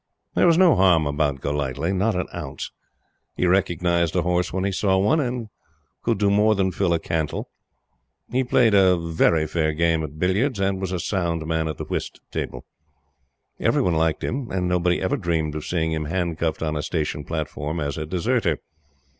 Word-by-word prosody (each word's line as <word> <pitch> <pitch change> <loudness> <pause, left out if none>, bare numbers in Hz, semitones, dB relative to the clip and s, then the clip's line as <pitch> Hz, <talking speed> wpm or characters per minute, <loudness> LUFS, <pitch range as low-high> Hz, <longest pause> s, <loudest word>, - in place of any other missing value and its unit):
There - - +4
was 165 -1 +5
no 180 -5 +6
harm 90 -5 +4
about 70 -2 0
Golightly 75 +4 -1
not 100 +3 +1
an 90 -1 -1
ounce. - - -6 0.6
He - - 0
recognized 85 -2 +1
a 90 - +2
horse 90 +1 0
when 95 0 -2
he 100 - 0
saw 95 0 +1
one, 105 +11 +3
and 125 -5 -2 0.5
could 115 -2 0
do 100 0 +2
more 105 +2 +4
than 95 -1 +1
fill 90 0 0
a - - +3
cantle. 80 -2 -3 0.8
He 130 +2 +2
played 120 -3 +3
a 95 -2 +5
very 80 -1 +2
fair 80 -1 0
game 85 0 +2
at 75 0 -7
billiards, 100 - +1
and 95 0 0
was 95 -1 -2
a 90 - -2
sound 85 -4 -1
man 80 0 0
at 80 - -4
the - - -5
whist - - -4
table. 60 - -4 0.9
Everyone 90 - +2
liked 80 -1 +1
him; 130 -1 -3
and 90 -1 -1
nobody 90 0 +1
ever 95 - 0
dreamed 80 -3 -1
of 75 -1 -5
seeing 80 -2 0
him 80 -1 -2
handcuffed 85 -1 -1
on 80 -1 -1
a 75 - -1
station 75 -2 -2
platform 80 0 -4
as 70 -2 -2
a 75 -1 -4
deserter. 90 - 0
85 Hz, 190 wpm, -23 LUFS, 80-95 Hz, 0.9 s, no